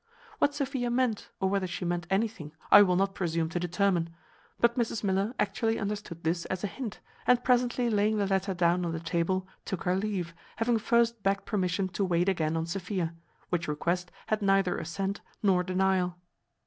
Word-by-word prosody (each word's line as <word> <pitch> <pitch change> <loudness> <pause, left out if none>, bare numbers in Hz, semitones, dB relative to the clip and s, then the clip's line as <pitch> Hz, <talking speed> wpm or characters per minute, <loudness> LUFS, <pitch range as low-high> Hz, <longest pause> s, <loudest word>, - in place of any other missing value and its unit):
What 285 - +2
Sophia 270 -4 -1
meant, 240 -3 0
or 190 - +1
whether 195 -1 0
she 180 0 -4
meant 175 0 -2
anything, 195 -7 -1 0.2
I - - +11
will 180 -3 +4
not 195 +1 +1
presume 165 -3 -1
to 175 - -2
determine; 175 -1 +1 0.5
but 235 0 +4
Mrs 230 -3 -1
Miller 200 +4 0
actually 225 +2 0
understood 200 -5 -4
this 165 +1 0
as 185 +1 -4
a - - +1
hint, 225 0 -6 0.3
and 250 -1 +4
presently 245 -1 +2
laying 215 -1 +2
the 205 - +1
letter 195 0 0
down 175 +1 +2
on 170 -1 -2
the 165 - -3
table, 170 +3 -1 0.2
took 190 - -4
her 180 0 +1
leave, 190 -4 -2 0.2
having 230 0 +1
first 235 0 +2
begged 195 0 0
permission 190 -2 0
to 180 +2 -2
wait 175 -1 +1
again 165 -4 0
on 160 - -1
Sophia; 180 -1 -3 0.4
which 170 -1 -1
request 175 +4 -1 0.2
had 215 0 0
neither 195 -2 +3
assent 195 +4 -3 0.2
nor 190 -3 +4
denial. 185 -1 +1
190 Hz, 185 wpm, -29 LUFS, 175-215 Hz, 0.5 s, I